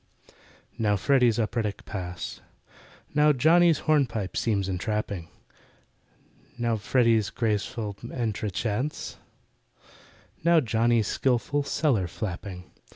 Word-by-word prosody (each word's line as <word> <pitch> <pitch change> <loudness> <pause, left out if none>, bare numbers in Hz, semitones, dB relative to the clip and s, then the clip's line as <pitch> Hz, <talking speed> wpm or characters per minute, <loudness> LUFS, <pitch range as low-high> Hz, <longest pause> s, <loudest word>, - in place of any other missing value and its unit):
Now 105 -2 +2
FREDDY'S 120 +2 +3
operatic 110 -2 -2
pas— 90 -3 -6 0.7
Now 150 +1 +5
JOHNNY'S 160 +4 +4
hornpipe 125 - +1
seems 100 -4 0
entrapping: 95 -2 -3 1.3
Now 120 -1 0
FREDDY'S 115 0 +2
graceful 105 -2 -2
entrechats— 110 +3 -3 1.3
Now 170 0 +5
JOHNNY'S 115 -3 +2
skilful 135 +3 +1
"cellar 135 - +1
flapping." 90 0 -6
115 Hz, 85 wpm, -26 LUFS, 100-130 Hz, 1.3 s, Now